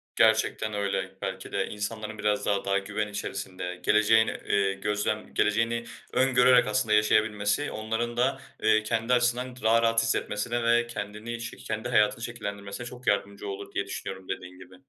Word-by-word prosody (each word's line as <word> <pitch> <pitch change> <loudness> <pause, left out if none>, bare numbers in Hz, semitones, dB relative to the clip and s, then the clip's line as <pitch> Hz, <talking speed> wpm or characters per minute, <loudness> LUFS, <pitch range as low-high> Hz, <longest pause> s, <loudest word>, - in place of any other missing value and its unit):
Gerçekten 110 -1 +3
öyle. 100 -2 -2
Belki 95 0 -5
de 95 -1 0
insanların 110 +1 -5
biraz 105 -1 0
da 100 -1 0
daha 100 0 +2
güven 105 +2 -2
içerisinde, 95 -3 -5
geleceğin, 110 +2 +5
eee, 100 -1 0
gözlem 105 +2 -2
geleceğini 115 +2 +1 0.3
öngörerek 125 -2 +5
aslında 105 0 +1
yaşayabilmesi, 105 +4 +2
onların 115 +2 -3
da, 135 +2 +2 0.2
eee, 110 0 +4
kendi 115 +2 0
açısından 125 +1 +1
daha 115 +1 +5
rahat 115 0 +3
hissetmesine 115 +1 -1
ve 120 0 +3
kendini 110 +1 -5
şe 115 - -6
kendi 110 +2 -4
hayatını 110 -1 +3
şekillendirmesine 100 -2 -6
çok 125 0 -11
yardımcı 100 0 0
olur 100 -1 -6
diye - - -1
düşünüyorum, 95 -1 -6
dediğin 90 0 -6
gibi. 95 0 -13
110 Hz, 155 wpm, -27 LUFS, 100-115 Hz, 0.3 s, geleceğin